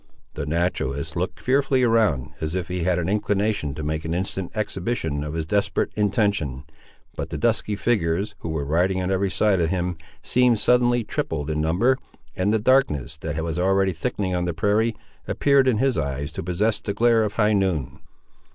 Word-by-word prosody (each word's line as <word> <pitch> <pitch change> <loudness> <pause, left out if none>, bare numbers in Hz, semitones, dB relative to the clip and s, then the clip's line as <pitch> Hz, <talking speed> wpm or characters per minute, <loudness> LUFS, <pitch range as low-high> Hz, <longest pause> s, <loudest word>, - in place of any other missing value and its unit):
The 70 - -5
naturalist 80 -3 -1
looked 90 +4 -2
fearfully 135 0 +2
around, 110 - +2
as 80 +2 -2
if 90 -1 -3
he 90 -1 -2
had 90 -1 +2
an 85 -1 -1
inclination 105 -6 0
to 75 - -5
make 80 +1 -2
an 80 +1 -2
instant 95 0 -3
exhibition 95 -7 -2
of 75 +1 -5
his 80 -1 -2
desperate 100 +4 0
intention; 100 - 0 0.5
but - - -4
the - - -4
dusky 110 -2 0
figures, 100 -2 0
who 85 - -6
were 80 -3 -2
riding 90 +6 +1
on 90 +1 -1
every 95 +1 +1
side 100 -1 +2
of 80 - +1
him, 90 -1 -1 0.3
seemed 125 -2 +3
suddenly 120 +1 +3
tripled 80 -7 -3
in 75 0 -1
number, 100 +12 +2 0.4
and 95 +3 +1
the 110 - +3
darkness, 105 - +2
that 80 0 -4
was 80 +1 -2
already 95 +1 +2
thickening 95 0 -2
on 90 0 0
the 85 -2 -2
prairie, 105 +6 +1 0.3
appeared 140 -2 +3
in 125 -4 +3
his 130 +2 +1
eyes 70 +2 -3
to - - -5
possess 105 +5 0
the 100 - -4
glare 115 -1 +4
of 105 -1 -2
high 105 -1 +2
noon. 90 -10 0
95 Hz, 190 wpm, -23 LUFS, 80-110 Hz, 0.5 s, glare